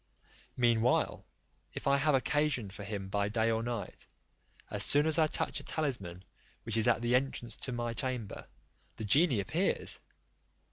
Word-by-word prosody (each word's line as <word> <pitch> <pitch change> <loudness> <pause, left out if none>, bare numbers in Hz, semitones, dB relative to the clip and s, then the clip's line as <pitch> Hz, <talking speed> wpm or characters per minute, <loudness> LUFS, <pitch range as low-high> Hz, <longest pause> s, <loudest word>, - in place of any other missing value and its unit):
Meanwhile, 120 -1 +2 0.5
if - - -6
I 140 0 +4
have 145 +1 +3
occasion 135 -6 0
for 100 - -8
him 100 -1 -5
by 100 +1 0
day 110 +1 +1
or 110 0 0
night, 120 -2 -5 0.6
as - - +2
soon 145 +1 +5
as 160 +1 +2
I 155 - +5
touch - - 0
a - - -10
talisman, 120 - -3 0.4
which 115 -2 -3
is 115 +1 +3
at 120 -1 +2
the 120 +1 +1
entrance 125 -2 0
into 130 - -5
my 120 -1 -2
chamber, 125 -4 -4 0.5
the 110 - -5
genie 140 - +4
appears. 160 - -1
120 Hz, 160 wpm, -32 LUFS, 110-140 Hz, 0.6 s, soon